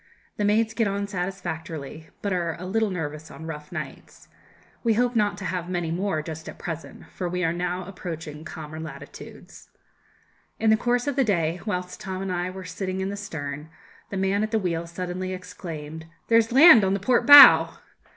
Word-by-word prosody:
The 210 - 0
maids 220 +2 +2
get 225 -2 +1
on 200 0 -2
satisfactorily, 170 -5 -5
but 200 -2 -1
are 170 -3 -1
a 180 - -7
little 220 +3 0
nervous 155 -3 -5
on 160 - -10
rough 150 -2 -8
nights. - - -8 0.5
We 230 -2 +2
hope 245 +2 +1
not 210 -2 +1
to 195 - -7
have 180 -1 -3
many 175 -3 -2
more 170 -3 -1
just 160 0 -7
at - - -10
present, 165 -1 -7
for 180 -2 -4
we 180 +1 -2
are 165 -1 +1
now 180 +1 -3
approaching 165 -5 -7
calmer 155 -1 -8
latitudes. 160 0 -11 0.9
In 220 0 +3
the - - +6
course 245 +2 0
of 285 -2 -2
the 270 - +4
day, 175 -6 0
whilst 180 -2 -4
Tom 190 -2 -5
and 195 - -3
I 180 0 -2
were 185 0 -8
sitting 185 +1 -4
in 190 0 -2
the 200 - -4
stern, 150 -7 -6 0.4
the 195 - -4
man 195 +2 +1
at 215 - -1
the 220 - +1
wheel 170 -4 -2
suddenly 180 +2 -4
exclaimed, 160 -4 -8 0.2
'There's 230 0 +4
land 270 - +8
on 190 0 +2
the - - -2
port 240 +4 +1
bow.' 290 -1 +10
185 Hz, 190 wpm, -25 LUFS, 165-205 Hz, 0.9 s, bow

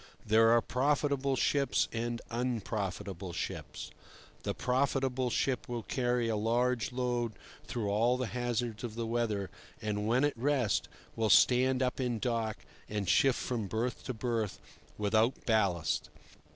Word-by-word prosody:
There 110 +1 +5
are 115 0 +5
profitable 140 0 +1
ships 140 +2 +2
and 120 0 -2
unprofitable 100 -6 -3
ships. - - -5 0.5
The - - -3
profitable 130 0 +1
ship 125 -1 0
will 120 -2 -3
carry 120 -1 0
a 115 - 0
large 120 +3 +1
load 120 -2 -1 0.3
through 115 -4 -2
all 115 +5 +3
the 130 - -1
hazards 120 -2 -2
of 115 -3 -5
the 115 0 -2
weather, 115 -4 -1 0.3
and, 105 -1 -2
when 125 +4 +3
at 145 - +2
rest, 130 -2 +1 0.3
will 110 -1 +1
stand 130 +5 +5
up 125 +1 -1
in 125 -3 0
dock 115 -2 -1 0.3
and 105 -2 -2
shift 130 +7 +4
from 115 -5 -2
berth 115 +4 -2
to 130 - -3
berth 110 -2 -2 0.4
without 110 +4 +1
ballast. 100 -8 +1
120 Hz, 140 wpm, -32 LUFS, 110-125 Hz, 0.5 s, There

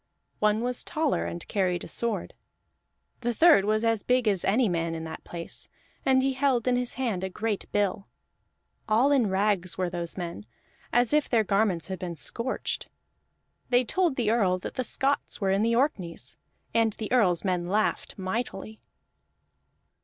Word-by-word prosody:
One 210 +1 +2
was 245 0 -1
taller, 310 -2 0
and 170 - -6
carried 180 -3 0
a - - -7
sword. 235 -1 -2 0.9
The 240 -1 -2
third 320 - +6
was 215 +2 +1
as 225 -2 +2
big 250 -2 +1
as 195 -4 +2
any 225 +5 +3
man 165 -2 -1
in 160 - -5
that 160 0 -7
place, 170 -1 -5 0.3
and 260 -1 +3
he 270 0 +1
held 260 -3 +1
in 250 - +3
his 245 -2 -2
hand 230 -8 -1
a 190 - -2
great 215 +1 -3
bill. 200 -1 0 0.8
All 235 +7 +4
in 255 -7 +3
rags 190 -2 +1
were 180 -2 -1
those 170 -1 -4
men, 170 - -5 0.4
as 245 +2 +3
if 300 -1 +2
their 230 -3 +3
garments 195 -4 +1
had 190 -2 -4
been 175 -2 -4
scorched. 230 - -3 0.8
They 245 0 +4
told 345 +3 +1
the 230 -4 +1
Earl 195 -6 +2
that 185 - -7
the 255 - -2
Scots 275 +3 -1
were 195 -3 +1
in 195 +1 +2
the 230 +1 +2
Orkneys, 185 - -1 0.4
and 225 -1 +3
the 215 0 -6
Earl's 195 -9 +3
men 180 -2 0
laughed 215 +4 0
mightily. 215 +2 -4
215 Hz, 170 wpm, -27 LUFS, 185-245 Hz, 0.9 s, third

